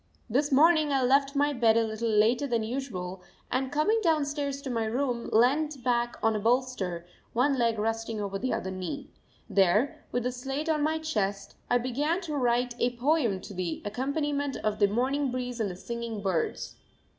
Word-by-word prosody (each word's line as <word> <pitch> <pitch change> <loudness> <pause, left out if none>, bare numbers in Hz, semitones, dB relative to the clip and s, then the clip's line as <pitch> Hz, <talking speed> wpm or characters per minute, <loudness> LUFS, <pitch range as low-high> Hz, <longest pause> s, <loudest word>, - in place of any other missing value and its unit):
This 280 +6 +1
morning 310 +1 +5
I 270 -2 +2
left 275 +2 +3
my 290 +1 +2
bed 230 -3 +4
a 230 - +4
little 220 +1 -2
later 225 +6 +3
than 235 -3 0
usual 210 -7 -4 0.3
and, 260 +1 0
coming 310 +10 +2
downstairs 290 -5 0
to 265 - -4
my 230 -2 0
room, 240 +1 -1
leant 275 +4 +2
back 240 -1 +1
on 225 0 +3
a - - 0
bolster, 225 -7 0 0.3
one 270 +4 +3
leg 230 -2 +2
resting 225 +1 -2
over 195 -1 -3
the 255 - -1
other 190 - -2
knee. 185 -2 -5 0.4
There, 210 - +2
with 245 0 -1
a 250 - +1
slate 270 +5 -4
on 305 -2 +2
my 310 +2 +1
chest, 205 -11 -2 0.2
I 245 - +4
began 280 +8 0
to 330 -5 -5
write 245 -2 +1
a 245 0 0
poem 245 - +1
to - - -9
the 180 -3 -3
accompaniment 280 +5 -1
of 215 0 -1
the 205 - +5
morning 260 +6 0
breeze 250 -1 -4
and 215 -3 0
the 180 - -6
singing 230 +1 -5
birds. 180 -5 -2
245 Hz, 185 wpm, -28 LUFS, 220-280 Hz, 0.4 s, morning